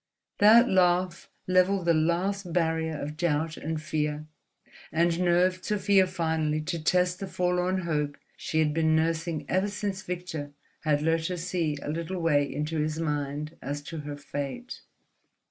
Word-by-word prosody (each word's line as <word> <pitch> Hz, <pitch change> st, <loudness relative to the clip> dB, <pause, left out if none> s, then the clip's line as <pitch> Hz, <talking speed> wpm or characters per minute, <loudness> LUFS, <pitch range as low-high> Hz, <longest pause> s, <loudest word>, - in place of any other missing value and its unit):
That 225 Hz, +4 st, +7 dB
laugh 180 Hz, -3 st, +2 dB, 0.2 s
levelled 185 Hz, 0 st, +3 dB
the 170 Hz, -, +4 dB
last 175 Hz, +4 st, 0 dB
barrier 160 Hz, -2 st, 0 dB
of 150 Hz, +2 st, -5 dB
doubt 160 Hz, -1 st, 0 dB
and 160 Hz, 0 st, -3 dB
fear 150 Hz, -1 st, -2 dB, 0.7 s
and 170 Hz, +1 st, +2 dB
nerved 180 Hz, +1 st, +2 dB
Sofia 200 Hz, -2 st, +3 dB
finally 160 Hz, -4 st, 0 dB
to 160 Hz, +1 st, -4 dB
test 180 Hz, +2 st, +2 dB
the 195 Hz, -, -4 dB
forlorn 180 Hz, +1 st, 0 dB
hope 150 Hz, -4 st, -1 dB, 0.2 s
she 160 Hz, -, -4 dB
had 155 Hz, -1 st, +3 dB
been 160 Hz, 0 st, +2 dB
nursing 160 Hz, -1 st, 0 dB
ever 190 Hz, +2 st, +1 dB
since 200 Hz, -1 st, -3 dB
Victor 170 Hz, -6 st, -5 dB, 0.3 s
had 150 Hz, -2 st, +1 dB
let 165 Hz, 0 st, +1 dB
her 180 Hz, -, -3 dB
see 165 Hz, -3 st, -1 dB
a 145 Hz, -, -3 dB
little 170 Hz, +3 st, -3 dB
way 145 Hz, -4 st, +2 dB
into 150 Hz, +3 st, -2 dB
his 155 Hz, +1 st, -1 dB
mind 150 Hz, 0 st, -2 dB
as 145 Hz, +2 st, -4 dB
to 160 Hz, +2 st, -6 dB
her 145 Hz, -1 st, -6 dB
fate. 145 Hz, -, -6 dB
165 Hz, 155 wpm, -28 LUFS, 155-180 Hz, 0.7 s, That